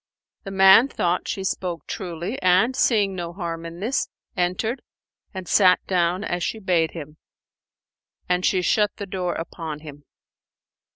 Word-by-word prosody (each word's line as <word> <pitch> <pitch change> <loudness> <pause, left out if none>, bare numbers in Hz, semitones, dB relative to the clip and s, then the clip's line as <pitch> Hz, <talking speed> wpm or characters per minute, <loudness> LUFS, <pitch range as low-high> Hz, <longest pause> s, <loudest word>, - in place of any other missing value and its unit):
The - - -5
man 195 +5 +7
thought 175 -8 -1
she 195 - -3
spoke 180 -4 -3
truly 180 +4 -5
and, 185 +8 +3
seeing 205 -7 +2
no 170 -1 -5
harm 170 -2 -5
in 170 +2 -10
this, 240 +6 -1 0.3
entered 185 +7 -1 0.5
and 190 -2 -7
sat 185 -1 +5
down 180 +1 +1
as 175 -4 -2
she 220 - -2
bade 180 -6 +1
him; 155 -2 -9 1.1
and 180 0 +1
she 185 -1 +2
shut 210 +3 +3
the 200 - -5
door 185 -2 -3
upon 160 -2 -6
him. 145 -2 -11
180 Hz, 150 wpm, -23 LUFS, 170-195 Hz, 1.1 s, man